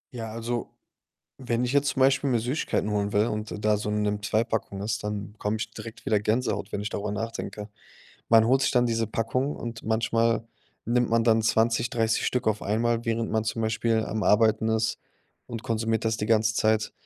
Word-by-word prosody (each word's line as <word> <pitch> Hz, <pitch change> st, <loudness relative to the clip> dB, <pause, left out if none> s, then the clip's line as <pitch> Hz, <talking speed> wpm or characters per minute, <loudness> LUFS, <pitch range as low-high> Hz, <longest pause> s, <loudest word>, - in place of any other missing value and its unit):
Ja, 115 Hz, -2 st, -5 dB
also, 115 Hz, +1 st, -3 dB, 0.7 s
wenn 120 Hz, -2 st, -1 dB
ich 125 Hz, -, -1 dB
jetzt 140 Hz, 0 st, +3 dB
zum 130 Hz, -, -3 dB
Beispiel 135 Hz, +1 st, +4 dB
mir 120 Hz, -3 st, +2 dB
Süßigkeiten 125 Hz, -2 st, -1 dB
holen 105 Hz, -1 st, -1 dB
will 105 Hz, +2 st, +3 dB
und 105 Hz, -1 st, -4 dB
da 105 Hz, 0 st, +4 dB
so 105 Hz, 0 st, -4 dB
'ne 105 Hz, 0 st, 0 dB
Nimm2-Packung 105 Hz, -1 st, -1 dB
ist, 105 Hz, 0 st, -2 dB
dann 105 Hz, -1 st, -4 dB
bekomme 105 Hz, 0 st, -2 dB
ich 115 Hz, -, -4 dB
direkt 115 Hz, -1 st, -10 dB
wieder 105 Hz, -, +2 dB
Gänsehaut, 110 Hz, -1 st, -1 dB
wenn -, -, -2 dB
ich 105 Hz, -, -3 dB
darüber 105 Hz, 0 st, -3 dB
nachdenke. 110 Hz, -1 st, -5 dB, 0.6 s
Man 115 Hz, -1 st, +6 dB
holt 130 Hz, +2 st, +4 dB
sich -, -, +2 dB
dann 125 Hz, -2 st, +3 dB
diese 115 Hz, -2 st, 0 dB
Packung 120 Hz, +6 st, -1 dB
und 115 Hz, -1 st, -6 dB
manchmal 115 Hz, +1 st, +1 dB, 0.4 s
nimmt 120 Hz, 0 st, +1 dB
man 115 Hz, 0 st, +3 dB
dann 115 Hz, -1 st, +4 dB
20, 115 Hz, +2 st, +2 dB
30 115 Hz, -2 st, +1 dB
Stück 125 Hz, -2 st, -1 dB
auf 110 Hz, -1 st, +1 dB
einmal, 115 Hz, +3 st, 0 dB
während 115 Hz, 0 st, -1 dB
man 110 Hz, 0 st, +2 dB
zum 110 Hz, +1 st, -3 dB
Beispiel 110 Hz, 0 st, +1 dB
am 110 Hz, -2 st, -3 dB
Arbeiten 110 Hz, +3 st, +3 dB
ist 110 Hz, 0 st, 0 dB, 0.5 s
und 115 Hz, -2 st, -7 dB
konsumiert 115 Hz, 0 st, -1 dB
das 110 Hz, 0 st, +1 dB
die 105 Hz, -, -3 dB
ganze 110 Hz, 0 st, +3 dB
Zeit. 110 Hz, 0 st, +1 dB
115 Hz, 195 wpm, -26 LUFS, 110-115 Hz, 0.7 s, Man